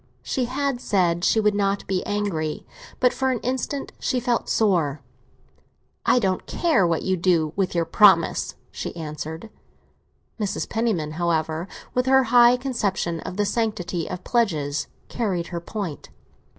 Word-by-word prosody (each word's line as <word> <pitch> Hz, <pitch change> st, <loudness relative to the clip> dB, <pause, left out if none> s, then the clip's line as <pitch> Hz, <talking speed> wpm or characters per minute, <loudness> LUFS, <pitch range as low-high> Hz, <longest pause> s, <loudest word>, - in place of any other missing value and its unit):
She 255 Hz, -, -1 dB
had 265 Hz, 0 st, -2 dB
said 175 Hz, -3 st, +1 dB
she 220 Hz, -, +3 dB
would 210 Hz, -1 st, +3 dB
not 200 Hz, 0 st, 0 dB
be 185 Hz, -1 st, -1 dB
angry; 190 Hz, -7 st, -2 dB, 0.3 s
but 250 Hz, -1 st, +3 dB
for 265 Hz, 0 st, 0 dB
an 255 Hz, -, +1 dB
instant 260 Hz, +3 st, -3 dB
she 255 Hz, -, 0 dB
felt 245 Hz, -1 st, -1 dB
sore. 165 Hz, -10 st, +1 dB, 1.1 s
"I -, -, +5 dB
don't 190 Hz, -6 st, 0 dB
care 315 Hz, -, +2 dB
what 165 Hz, -1 st, 0 dB
you 190 Hz, -, +1 dB
do 165 Hz, -3 st, +1 dB
with 190 Hz, -3 st, -1 dB
your 170 Hz, -1 st, +2 dB
promise!" 205 Hz, +1 st, +4 dB, 0.2 s
she -, -, -6 dB
answered. 160 Hz, +4 st, -6 dB, 0.9 s
Mrs. 205 Hz, -3 st, -2 dB
Penniman, 220 Hz, -10 st, -1 dB
however, 160 Hz, 0 st, 0 dB, 0.3 s
with 250 Hz, +1 st, 0 dB
her 265 Hz, 0 st, +5 dB
high 240 Hz, 0 st, +7 dB
conception 205 Hz, -10 st, -1 dB
of 180 Hz, -, -7 dB
the 205 Hz, -, +2 dB
sanctity 200 Hz, -6 st, -2 dB
of 180 Hz, 0 st, -6 dB
pledges, 150 Hz, -, 0 dB, 0.2 s
carried 185 Hz, -7 st, -2 dB
her 170 Hz, -, -3 dB
point. 180 Hz, -4 st, -5 dB
195 Hz, 150 wpm, -24 LUFS, 170-235 Hz, 1.1 s, high